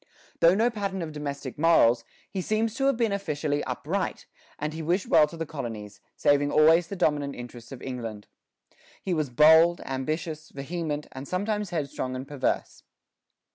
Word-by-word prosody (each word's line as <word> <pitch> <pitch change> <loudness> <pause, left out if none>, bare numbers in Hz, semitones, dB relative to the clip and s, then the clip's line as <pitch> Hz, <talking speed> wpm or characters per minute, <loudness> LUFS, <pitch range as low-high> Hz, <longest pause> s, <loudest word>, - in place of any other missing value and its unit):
Though 170 +2 +6
no 230 +4 +3
pattern 200 -4 -3
of 160 - -5
domestic 140 -3 -6
morals, 125 -8 +5 0.3
he 190 - -2
seems 215 +3 0
to 270 +3 -1
have 275 -4 +2
been 230 -3 +1
officially 150 -7 -1
upright, - - -3 0.3
and 150 +1 -3
he 160 - -5
wished 175 +5 0
well 155 -2 +5
to 165 - -10
the 165 - -3
colonies, 110 -9 -7
saving 145 0 +3
always 160 +3 +5
the 200 - -5
dominant 145 -6 0
interests 120 0 -10
of 135 - -9
England. 115 -5 -5 0.8
He 185 - -1
was 155 -4 0
bold, 160 +6 +6
ambitious, 155 +4 -3
vehement, 150 +1 -4
and 135 +1 -8
sometimes 205 +2 -1
headstrong 140 -6 -3
and 130 +1 -6
perverse. 145 -2 -2
155 Hz, 165 wpm, -27 LUFS, 135-175 Hz, 0.8 s, Though